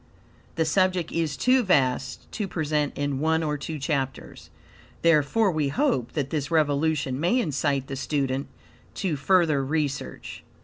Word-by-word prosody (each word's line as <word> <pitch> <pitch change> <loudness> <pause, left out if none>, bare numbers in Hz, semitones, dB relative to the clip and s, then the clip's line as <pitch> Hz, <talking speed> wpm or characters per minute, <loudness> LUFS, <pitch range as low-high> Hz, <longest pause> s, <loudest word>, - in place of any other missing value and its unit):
The 160 - +1
subject 185 +1 +1
is 160 -4 -1
too 255 +1 +4
vast 135 - +1
to 210 -3 -3
present 150 -4 -1
in 145 -2 -1
one 160 +2 +1
or 150 -1 -1
two 155 +2 -5
chapters. 135 -3 -4 0.5
Therefore 170 +6 +3
we 155 -3 0
hope 145 - 0
that 140 -3 -2
this 150 -3 -2
revelation 145 -3 +1
may 175 +11 +2
incite 145 - 0
the 135 0 -6
student 135 0 -1 0.5
to 180 -6 -1
further 155 -1 +2
research. 145 -1 -3
150 Hz, 140 wpm, -25 LUFS, 140-165 Hz, 0.5 s, too